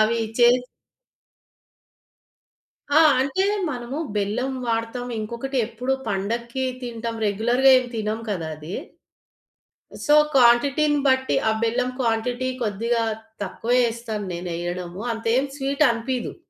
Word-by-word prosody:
అవి 225 +2 +3 0.2
చేసి 245 +1 +5 2.2
ఆ! 300 - +6 0.2
అంటే 280 +8 0 0.3
మనము 245 +1 -5 0.2
బెల్లం 215 +6 -1
వాడతాం. 230 +2 -2
ఇంకొకటి 235 +5 -4
ఎప్పుడు 245 +3 -3 0.2
పండక్కి 235 +6 -2 0.2
తింటాం. 230 -1 -4
రెగ్యులర్‌గా 240 +6 +3
ఏం 255 - -3
తినము 220 0 -2
కదా 170 -6 -3
అది. 155 +5 -8 1.3
సో 295 0 +5 0.2
క్వాంటిటీని 275 +4 +4
బట్టి 260 0 +2
ఆ - - +3
బెల్లం 245 +2 +1
క్వాంటిటీ 245 +2 0
కొద్దిగా 230 +2 0 0.4
తక్కువే 235 +6 -1
యేస్తాను 230 -3 -3
నేను 175 +1 -5
ఎయ్యడము 175 +2 -5
అంతేం 230 +4 +1
స్వీటనిపియదు. 265 -3 0
235 Hz, 105 wpm, -23 LUFS, 220-255 Hz, 2.2 s, ఆ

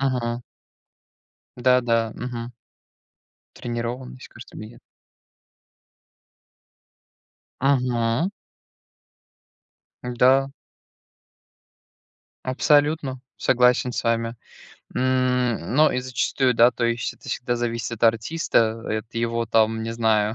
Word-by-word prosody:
Мгм. 125 -3 -1 1.1
Да-да, 120 -3 +2
мгм. 120 0 -6 1.0
Тренированность, 120 +2 -5
кажется 120 +1 -13
мне, 110 - -8
нет? 120 - -16 2.8
Мгм. 125 - +1 1.7
Да. 130 +3 +3 1.9
Абсолютно. 145 0 +1 0.2
Согласен 125 0 +3
с - - -3
вами. 115 0 0 0.6
М, 125 -5 0
но 155 +2 +5
и 125 - -1
зачастую, 130 0 0
да, 120 +2 +6
то 120 -1 -3
есть 115 0 -1
это - - -14
всегда 120 0 -2
зависит 115 0 -3
от 115 - -8
артиста, 115 -1 +1
и - - 0
от 110 +2 -8
его, 115 0 -1
там, 110 0 +2
не 115 +1 -4
знаю, 110 -2 +1
120 Hz, 90 wpm, -23 LUFS, 115-130 Hz, 2.8 s, да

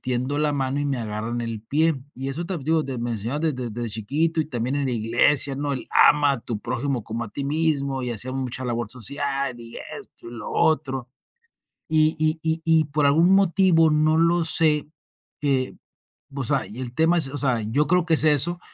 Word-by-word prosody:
tiendo 130 +3 -2
la 150 -1 +1
mano 135 0 -1
y - - -1
me 140 -2 -1
agarran 115 +1 -3
el 115 -2 -4
pie. 155 +7 +1 0.2
Y 135 +2 -5
eso 155 +6 -3
también 170 -6 -5
te 160 - -2
digo, 160 -1 +3
de 135 -3 -5
me 120 0 -3
enseñaron 115 +8 -3
de 160 -2 +1
desde 125 -3 -5
de 120 +1 -4
chiquito 145 +10 -1
y 155 - -2
también 125 -1 -3
en 140 -1 -1
la - - -1
iglesia, 120 +5 +3
¿no? 145 +1 -2
El 130 - -5
ama 145 -1 +5
a 135 - -3
tu 115 -1 -5
prójimo 130 +1 -3
como 115 +2 -4
a - - -8
ti 140 - -5
mismo 140 -3 0
y 125 - -3
hacía 120 +3 -3
mucha 130 -1 -4
labor 120 -3 -2
social 140 +2 -2
y 115 0 -9 0.2
esto - - -15
y - - -10
lo 115 -3 -7
otro. 135 -5 0 0.8
Y 155 0 +2
y 155 +1 0
y 160 0 -1
y 160 -2 +4
por 145 0 0
algún 160 +5 +4
motivo 175 -4 +4
no 155 +1 +2
lo 170 +1 +3
sé, 155 -2 +2 0.5
eh, 135 -3 0 0.6
pues, 135 -4 -3
ay, 140 -6 0
y - - -5
el 120 -2 -6
tema 165 +2 +3
es, 140 - +2
o 145 - -5
sea, 125 -5 +1
yo 135 +8 +1
creo 180 0 +3
que 165 - +3
es - - +4
eso, 155 +4 +4
140 Hz, 220 wpm, -23 LUFS, 120-155 Hz, 0.8 s, ama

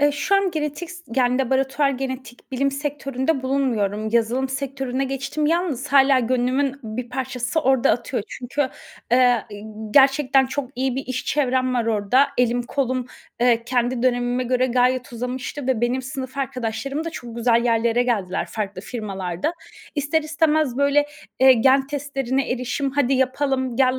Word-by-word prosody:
Eee, 290 0 +4
şu 385 +7 0
an 390 -1 +3
genetik 310 +1 -4
s 350 0 -11
yani, 250 -1 +3
laboratuvar 270 +2 +1
genetik 260 -1 -6
bilim 275 +2 +1
sektöründe 275 0 -2
bulunmuyorum. 220 -6 0
Yazılım 235 +3 +1
sektörüne 270 -1 -3
geçtim. 275 +3 -2
Yalnız 330 -6 0
hâlâ 275 -1 +5
gönlümün 255 +3 0
bir 230 +2 -5
parçası 255 +3 -2
orada 265 -3 +3
atıyor. 240 -1 -1
Çünkü, 260 +2 -2 0.4
eee, 245 -2 +4
ııı, 215 +1 -8
gerçekten 270 -1 +5
çok 265 -1 -4
iyi 260 0 -1
bir 270 - -4
iş 255 0 -3
çevrem 255 -3 +1
var 235 -2 0
orada. 225 +5 +3
Elim, 245 0 +2
kolum, 255 -1 -2 0.3
eee, 235 -1 +3
kendi 245 0 0
dönemime 245 0 +1
göre 255 +1 +1
gayet 250 0 +1
uzamıştı 250 +3 -4
ve 260 -4 +1
benim 245 +2 0
sınıf 260 0 -6
arkadaşlarım 270 +2 -3
da 330 - -3
çok 235 -4 -8
güzel 235 0 +2
yerlere 235 0 +2
geldiler 205 -7 -1
farklı 200 -3 -4
firmalarda. 195 - -4 0.4
İster 290 +2 0
istemez 310 -4 +1
böyle, 280 +1 +3 0.3
eee, 265 0 +8
gen 265 +3 +4
testlerine 275 -2 -2
erişim, 255 +3 -1
"Hadi 275 -1 +1
yapalım, 260 -1 0
gel 260 0 +3
260 Hz, 155 wpm, -22 LUFS, 245-275 Hz, 0.4 s, eee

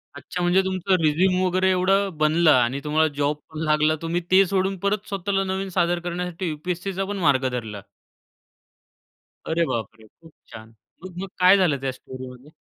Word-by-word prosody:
अच्छा 180 - -6
म्हणजे 175 +2 +3
तुमचं 190 0 0
रिझ्यूम 180 +4 +2
वगैरे 185 +1 +1
एवढं 195 +2 +2
बनलं 155 +2 +3
आणि 130 +1 +2
तुम्हाला 155 +1 +2
जॉब 145 +1 +1
पण 155 -1 -8
लागला 155 0 +2
तुम्ही 170 +2 -2
ते 190 +1 +6
सोडून 195 0 0
परत 200 +2 -1
स्वतःला 195 0 -1
नवीन 190 0 -3
सादर 175 0 +2
करण्यासाठी 175 +1 -4
यू-पी-एस-सीचा 180 +5 -4
पण 205 +1 -4
मार्ग 130 -2 +3
धरला 110 -5 -5 1.7
अरे 170 +1 +1
बापरे! 110 -4 -5
खूप 165 +8 -20 0.2
छान. 110 +1 -12 0.3
मग-मग 185 +1 -7
काय 185 +2 +6
झालं 175 -7 +2
त्या 135 -1 -2
स्टोरीमध्ये? 130 +2 -11
175 Hz, 155 wpm, -23 LUFS, 150-190 Hz, 1.7 s, ते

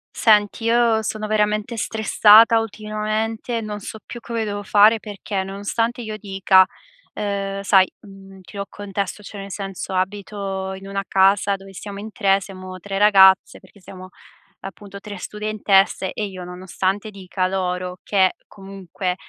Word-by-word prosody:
Senti, 210 0 +3
io 230 -1 +3
sono 215 0 -3
veramente 215 +2 0
stressata 220 +1 +5
ultimamente, 220 +2 -3
non 210 -1 -5
so 215 - -8
più 240 - -8
come 230 -1 -3
devo 205 -1 -4
fare 210 +2 +5
perché, 205 -2 -5
nonostante 205 +5 -2
io 215 -2 -6
dica 195 -2 +4 0.5
uhm, 200 -1 -3
sai, 190 -1 +4
mhmm, 195 -1 -14
ti 195 +2 -13
ho 200 - -2
il - - -17
contesto 200 0 -5
cioè, 205 - -10
nel 195 0 -8
senso, 195 -1 -6
abito 195 0 -3
in 190 +1 -10
una 195 0 -3
casa 195 +1 +3
dove 195 0 -12
siamo 200 +1 -8
in 215 +1 -8
3, 195 -2 +2
siamo 185 -1 -9
3 195 +2 -5
ragazze 195 -2 +5
perché 205 - -20
siamo, 185 0 -12 0.5
appunto, 200 +1 -10
3 205 0 -9
studentesse 205 -1 +1
e 215 - -3
io 185 -2 -8
nonostante 185 +3 -3
dica 185 -2 -3
loro 180 -1 -3
che, 190 -3 +2
comunque, 195 -2 -5
200 Hz, 150 wpm, -21 LUFS, 190-215 Hz, 0.5 s, stressata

